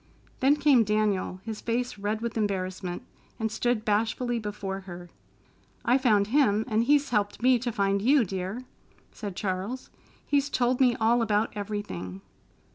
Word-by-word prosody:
Then 275 +3 +4
came 285 -5 +4
Daniel, 210 -3 0
his 220 -2 -5
face 235 -1 -2
red 210 +2 -2
with 235 -1 -3
embarrassment, 185 -2 -2 0.4
and 220 -1 -1
stood 225 0 0
bashfully 230 +3 0
before 205 -2 -4
her. 175 -2 -10 0.7
"I 250 +3 +4
found 215 -6 +3
him, 220 -3 +2
and 225 -1 +1
he's 290 0 +3
helped 210 0 0
me 255 -1 +5
to 240 +1 -2
find 200 -2 +1
you, 260 +2 +4
dear," 190 +5 -4 0.5
said 200 -4 -7
Charles. 195 +6 -4 0.3
"He's 285 0 +1
told 250 0 +1
me 250 -2 +5
all 230 +2 +2
about 215 -1 +1
everything." 195 - -5
215 Hz, 150 wpm, -27 LUFS, 200-245 Hz, 0.7 s, me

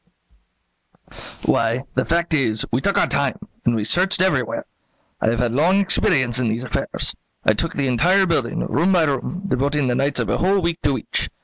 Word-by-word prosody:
"Why, 115 +3 +1
the 130 - 0
fact 170 0 0
is, 115 -7 +1
we 125 - 0
took 200 - 0
our - - +4
time, 140 -1 0 0.3
and 120 - +2
we 105 -2 -2
searched 185 - +2
everywhere. 150 -10 0 0.6
I - - +2
have 115 - 0
had 120 0 0
long 165 +10 +3
experience 130 - +2
in 125 - 0
these 115 +3 -2
affairs. 125 - -2 0.3
I - - +5
took - - -2
the 140 - 0
entire 175 +10 +3
building, 150 -9 -1
room 175 +6 +1
by 175 -3 +4
room; 155 +6 -2
devoting 140 -3 0
the - - +1
nights 140 0 0
of 115 - -1
a - - 0
whole 195 +2 +2
week 170 -2 -2
to 140 - +1
each. - - -3
140 Hz, 195 wpm, -21 LUFS, 120-170 Hz, 0.6 s, I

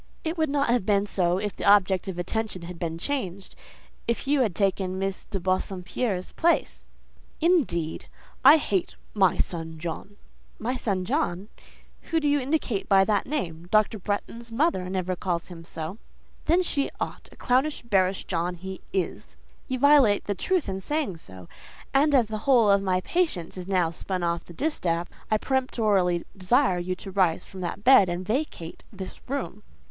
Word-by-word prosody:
"It 320 +1 -2
would 315 -3 0
not 280 -2 +1
have 245 -4 +2
been 200 0 +2
so 180 -3 +1
if 205 +1 -3
the - - -7
object 195 -2 +4
of 190 -2 -4
attention 185 +1 -3
had 170 0 -8
been 165 -1 -3
changed: 195 -4 -4 0.5
if 235 +3 -1
you 280 0 +2
had 210 -8 0
taken 190 -2 0
Miss 195 0 -2
de 195 - -4
Bassompierre's 185 +2 -2
place." 340 +1 0 0.5
"Indeed! 270 - +1 0.4
I 285 +4 +9
hate 195 - -1 0.2
'my 190 -3 +3
son 165 -2 -3
John!'" 170 +5 -6 0.4
"'My 245 +4 -2
son 195 -7 -1
John!'—whom 240 - -4
do 295 - 0
you 290 0 +3
indicate 265 -6 -1
by 195 -1 +6
that 205 0 0
name? 175 - -3
Dr. 215 +1 +2
Bretton's 230 +4 -4
mother 230 - +1
never 185 -1 -1
calls 175 -1 -3
him 170 -2 -10
so." 165 +5 -7 0.5
"Then 345 +3 +3
she 280 -5 0
ought. - - -5
A - - -15
clownish, 265 +4 +1
bearish 190 -4 +1
John 175 0 -1
he 190 +2 -8
is." 185 -3 -3 0.3
"You 260 - -2
violate 275 -6 +5
the 205 - -1
truth 365 - 0
in 190 0 -3
saying 290 - -2
so; 95 - -12 0.5
and 285 +1 +4
as 250 -4 +5
the 215 0 -5
whole 235 -6 +6
of 200 0 +4
my 185 -1 +1
patience 305 - -1
is 185 -1 -7
now 180 -4 +1
spun 180 +2 -4
off 170 0 -1
the 175 - -12
distaff, 175 - -1 0.2
I 215 - +3
peremptorily 210 -9 +1
desire 195 +1 +2
you 185 +1 -2
to 195 +1 -9
rise 185 -4 +1
from 190 - -10
that 180 +3 -4
bed, 250 -7 +7
and 175 +1 -3
vacate 215 - -3
this 190 - -8
room." 260 -7 -3
195 Hz, 175 wpm, -26 LUFS, 180-255 Hz, 0.5 s, I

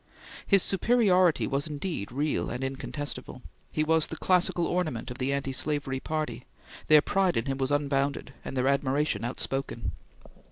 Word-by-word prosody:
His 195 -3 +5
superiority 195 -4 +3
was, 140 +2 -1
indeed, 150 - -4
real 145 +4 -1
and 125 +2 -4
incontestable; 135 -1 -5 0.3
he 155 - 0
was 160 0 +3
the 160 - -6
classical 180 -2 +2
ornament 155 -10 -2
of 125 - -8
the 130 +1 0
anti 140 -1 -1
slavery 140 -1 -1
party; 140 -6 -4 0.4
their 155 -1 +7
pride 190 -3 +1
in 115 - 0
him 135 -1 -2
was 130 0 0
unbounded, 140 -1 0
and 135 - -6
their 130 +1 +2
admiration 140 -4 +1
outspoken. 120 -4 -3
140 Hz, 155 wpm, -28 LUFS, 130-160 Hz, 0.4 s, their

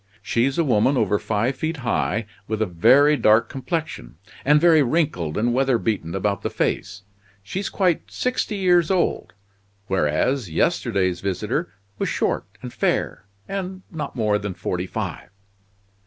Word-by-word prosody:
She's 125 +6 +1
a 170 - +3
woman 130 0 +2
over 105 -4 +2
five 115 +5 -1
feet 160 0 -2
high, 110 -1 0 0.2
with 110 0 -2
a 110 - +2
very 135 - +5
dark 110 -3 +4
complexion; 155 - -4 0.3
and 150 +2 +5
very 165 -1 +5
wrinkled 125 - 0
and 120 +3 +1
weatherbeaten 115 -9 0
about 100 0 -1
the - - -2
face. 95 - -2 0.4
She's 190 - -4
quite 180 -4 0
sixty 250 -4 -1
years 180 -4 +3
old; 185 -2 0 0.5
whereas, 95 - 0
yesterday's 95 - 0
visitor 95 -2 -2 0.3
was - - 0
short - - -1 0.2
and 125 - -7
fair, - - -1 0.2
and 190 -1 -5
not 150 -4 -5
more 105 -3 +1
than 105 -3 -5
forty 90 +1 -3
five." - - -5
120 Hz, 140 wpm, -23 LUFS, 100-160 Hz, 0.5 s, very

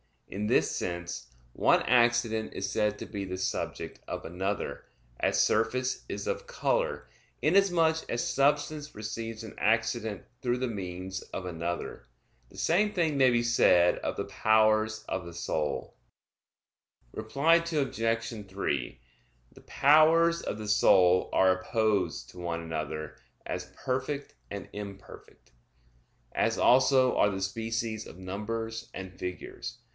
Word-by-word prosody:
In 105 +2 -3
this - - +3
sense 85 -6 -4 0.3
one - - +3
accident 120 -2 +2
is 95 0 -3
said 105 0 +1
to - - -6
be 100 -3 -5
the 95 -1 -5
subject 95 - -3
of - - -5
another; 95 +4 -3 0.3
as - - +3
surface 125 +4 0
is - - -4
of 485 0 -3
color, - - -1 0.3
inasmuch 175 -5 +4
as 120 - -1
substance 145 +1 +1
receives 110 +1 -5
an 110 - -9
accident 110 -1 0 0.2
through 120 -1 0
the 130 0 -1
means 95 -2 -5
of 95 - -4
another. 85 -7 -4 0.4
The - - -16
same 205 +5 +2
thing 165 -5 +1
may 130 -1 +6
be 120 -1 +2
said 90 -7 +4
of - - -3
the - - -3
powers 110 0 +2
of 95 -2 -3
the 85 - -9
soul. 80 -3 -3 1.2
Reply 140 +9 +2
Obj. 115 -9 -1
3: 75 -12 -3 0.5
The - - -16
powers 165 +3 +4
of - - -4
the 110 -1 -6
soul 95 -3 +5
are 95 -1 +4
opposed 95 - 0
to 90 - -12
one 85 -1 -3
another, 75 -1 -5 0.3
as 90 0 -5
perfect 135 +2 -3 0.2
and 100 0 -6
imperfect; 100 -8 -10 0.8
as - - +1
also 130 0 +4
are 105 - +4
the 95 -1 -4
species 110 +2 -3
of - - -12
numbers 110 +4 -5
and 95 -1 -8
figures. 90 0 -6
110 Hz, 135 wpm, -29 LUFS, 95-130 Hz, 1.2 s, may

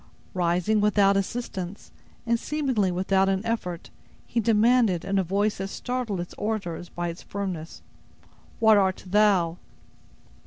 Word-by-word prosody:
Rising 180 +4 +1
without 205 -1 +4
assistance, 195 -2 -4 0.3
and 235 0 +1
seemingly 260 -11 0
without 190 +2 +2
an 195 +2 -1
effort, 180 -7 -3 0.3
he 235 - -1
demanded, 225 -4 +3
in 195 0 +1
a - - +2
voice 200 +4 0
that 195 - -2
startled 245 -2 -3
its 175 - -6
auditors 195 -5 -3
by 175 0 -3
its 170 - -7
firmness: 185 -5 -5 0.8
"What 220 -2 +6
art 190 -2 +1
thou?" 185 -4 +3
195 Hz, 130 wpm, -26 LUFS, 180-220 Hz, 0.8 s, What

